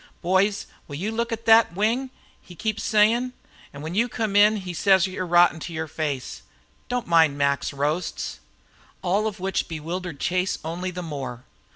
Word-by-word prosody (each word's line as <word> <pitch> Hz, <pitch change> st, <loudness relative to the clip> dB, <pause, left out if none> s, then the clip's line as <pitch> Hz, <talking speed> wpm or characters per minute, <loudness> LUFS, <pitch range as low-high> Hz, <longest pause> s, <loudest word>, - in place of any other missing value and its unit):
'Boys, 190 Hz, +3 st, +2 dB, 0.2 s
will 145 Hz, -, -7 dB
you 195 Hz, +9 st, -3 dB
look 235 Hz, +1 st, -2 dB
at 230 Hz, 0 st, -4 dB
thet 225 Hz, -6 st, +6 dB
wing?' 230 Hz, +7 st, 0 dB, 0.3 s
he 180 Hz, -, -14 dB
keeps 215 Hz, +3 st, -2 dB
sayin'. 230 Hz, +4 st, +3 dB, 0.4 s
An' 140 Hz, +1 st, -9 dB
when 160 Hz, +2 st, -5 dB
you 230 Hz, +5 st, +1 dB
come 215 Hz, -3 st, -2 dB
in 210 Hz, +1 st, +6 dB
he 185 Hz, -3 st, -6 dB
says 190 Hz, +1 st, +4 dB
you're 185 Hz, -1 st, -4 dB
rotten 175 Hz, -1 st, +5 dB
to 170 Hz, +2 st, -7 dB
yer 160 Hz, 0 st, -3 dB
face. 145 Hz, -, -4 dB, 0.5 s
Don't 245 Hz, -1 st, -1 dB
mind 160 Hz, -4 st, +4 dB
Mac's 140 Hz, 0 st, +1 dB
roasts." 150 Hz, +5 st, -2 dB, 0.6 s
All 200 Hz, +4 st, +1 dB
of 210 Hz, -2 st, -5 dB
which 190 Hz, 0 st, -1 dB
bewildered 165 Hz, 0 st, -5 dB
Chase 185 Hz, +1 st, 0 dB
only 175 Hz, +3 st, -3 dB
the 180 Hz, 0 st, -6 dB
more. 135 Hz, -6 st, -6 dB
180 Hz, 175 wpm, -24 LUFS, 160-210 Hz, 0.6 s, thet